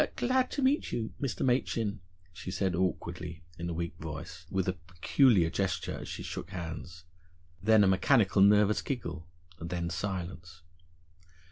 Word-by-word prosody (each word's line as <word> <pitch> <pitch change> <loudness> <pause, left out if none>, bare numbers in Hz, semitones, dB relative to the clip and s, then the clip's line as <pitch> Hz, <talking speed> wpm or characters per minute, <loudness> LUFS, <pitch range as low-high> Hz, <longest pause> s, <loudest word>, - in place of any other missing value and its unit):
"Glad 255 +1 +2
to 280 - -1
meet 275 +3 +2
you, 110 -2 -3
Mr. 135 -3 -1
Machin," 115 -5 +1 0.3
she 90 - -7
said 95 0 0
awkwardly, 90 -2 -2 0.2
in 85 0 -3
a - - -2
weak 85 0 -3
voice, 80 +1 -7
with 95 -1 0
a 90 - +2
peculiar 90 - +3
gesture 95 -2 -1
as - - -8
she - - -5
shook - - -6
hands. 85 -1 -6 0.6
Then, 110 0 +6
a - - +5
mechanical 95 +1 +4
nervous 105 +1 +5
giggle 85 - -4 0.3
and 85 - -5
then 85 -1 -2
silence. 85 -2 -5
95 Hz, 150 wpm, -30 LUFS, 85-110 Hz, 0.6 s, Then